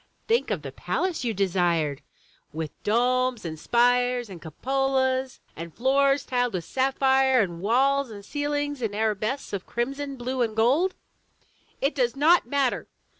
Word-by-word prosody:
Think 460 Hz, +1 st, +2 dB
of -, -, -2 dB
the -, -, -6 dB
palace 370 Hz, -6 st, -2 dB
you 235 Hz, -, 0 dB
desired, 175 Hz, -7 st, 0 dB, 0.5 s
with 155 Hz, -1 st, -4 dB
domes 250 Hz, 0 st, +1 dB
and 160 Hz, -2 st, -5 dB
spires 245 Hz, +1 st, +2 dB
and 175 Hz, -3 st, -9 dB
cupolas, 260 Hz, -, -1 dB, 0.2 s
and 165 Hz, 0 st, -8 dB
floors 275 Hz, +2 st, +2 dB
tiled 245 Hz, -2 st, 0 dB
with 180 Hz, -3 st, -3 dB
sapphire, 265 Hz, 0 st, +2 dB
and 175 Hz, -5 st, -1 dB
walls 270 Hz, +5 st, +2 dB
and 200 Hz, -2 st, -10 dB
ceilings 290 Hz, 0 st, -2 dB
in 215 Hz, -3 st, -2 dB
arabesques 215 Hz, +5 st, -2 dB
of 195 Hz, -2 st, -4 dB
crimson, 275 Hz, +4 st, -3 dB
blue 255 Hz, +1 st, -3 dB
and 225 Hz, -3 st, 0 dB
gold!'* 275 Hz, +12 st, +2 dB, 0.9 s
"It 275 Hz, +3 st, +1 dB
does 250 Hz, -2 st, 0 dB
not 310 Hz, +1 st, +4 dB
matter!" 275 Hz, -1 st, 0 dB
250 Hz, 145 wpm, -25 LUFS, 210-275 Hz, 0.9 s, not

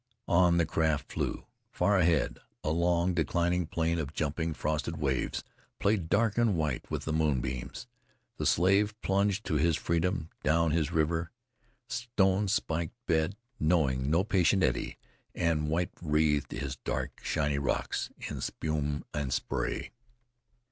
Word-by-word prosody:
On 85 Hz, -1 st, +4 dB
the 85 Hz, -, +3 dB
craft 80 Hz, -3 st, 0 dB
flew. -, -, -2 dB, 0.3 s
Far 100 Hz, +2 st, +2 dB
ahead, 80 Hz, -7 st, +2 dB, 0.2 s
a 75 Hz, -, 0 dB
long, 85 Hz, +2 st, +2 dB
declining 85 Hz, +2 st, +1 dB
plane 85 Hz, +1 st, 0 dB
of 75 Hz, 0 st, -4 dB
jumping 80 Hz, +1 st, -1 dB
frosted 80 Hz, +2 st, -2 dB
waves 65 Hz, -4 st, -1 dB, 0.3 s
played 100 Hz, -5 st, +1 dB
dark 110 Hz, +2 st, +2 dB
and 115 Hz, -5 st, +3 dB
white 75 Hz, -5 st, -2 dB
with -, -, -3 dB
the 80 Hz, -, -1 dB
moonbeams. 65 Hz, -5 st, -1 dB, 0.5 s
The -, -, 0 dB
Slave 100 Hz, +4 st, +3 dB
plunged 100 Hz, +2 st, +1 dB
to 80 Hz, -, +1 dB
his 80 Hz, +1 st, +2 dB
freedom, 85 Hz, 0 st, -1 dB
down 85 Hz, +2 st, +2 dB
his 80 Hz, -2 st, +1 dB
riven, 80 Hz, +2 st, +1 dB, 0.6 s
stone 105 Hz, -5 st, +1 dB
spiked 85 Hz, -3 st, -1 dB
bed, 80 Hz, +4 st, +1 dB, 0.2 s
knowing 70 Hz, -5 st, +2 dB
no 85 Hz, +4 st, +3 dB
patient 95 Hz, -2 st, +3 dB
eddy, 65 Hz, -, 0 dB, 0.4 s
and 80 Hz, -3 st, +1 dB
white 85 Hz, +3 st, 0 dB
wreathed 75 Hz, -3 st, +1 dB
his 70 Hz, -2 st, -4 dB
dark -, -, -3 dB
shiny 70 Hz, -1 st, 0 dB
rocks 70 Hz, -, -1 dB, 0.2 s
in -, -, -5 dB
spume 75 Hz, -2 st, -2 dB
and 70 Hz, -3 st, -2 dB
spray. 60 Hz, -, -2 dB
80 Hz, 140 wpm, -30 LUFS, 75-90 Hz, 0.6 s, On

